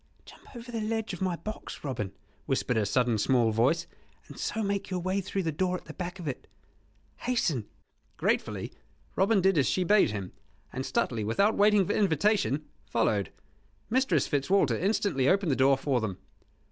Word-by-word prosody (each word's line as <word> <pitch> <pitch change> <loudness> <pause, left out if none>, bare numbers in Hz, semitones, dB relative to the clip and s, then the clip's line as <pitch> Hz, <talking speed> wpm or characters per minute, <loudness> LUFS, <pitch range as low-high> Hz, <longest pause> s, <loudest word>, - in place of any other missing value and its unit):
"Jump - - -16
over 240 +1 -8
the 230 -2 -3
ledge 220 -1 -2
of 180 - -7
my 185 -2 0
box, 215 +5 -8
Robin," 115 -9 -3 0.4
whispered 125 - 0
a 110 -2 +1
sudden 120 0 +1
small 120 -1 +3
voice, 125 +10 +2 0.4
"and - - -11
so 220 - -2
make 200 -1 -2
your 185 -1 -2
way 185 +3 -1
through 195 0 -3
the 165 - 0
door 180 +4 0
at - - -15
the - - -9
back 180 0 -5
of 175 -4 -7
it. 135 - -5 0.7
Hasten!" 165 - -1 0.5
Gratefully - - -1 0.4
Robin 195 +1 +3
did 190 -3 +3
as 130 - +2
she 185 - +1
bade 205 - +4
him; 100 -3 -5 0.4
and 130 - -3
Stuteley, 115 -3 -1
without 200 - +2
waiting 205 -1 +4
for - - -1
invitation, 190 -5 +2 0.2
followed. 105 -5 0 0.6
Mistress 240 - +2
Fitzwalter 165 +8 +2
instantly 185 -8 +1
opened 195 -5 +2
the - - +2
door 135 +1 +4
for 135 -2 0
them. 100 -4 -3
175 Hz, 175 wpm, -28 LUFS, 130-200 Hz, 0.7 s, bade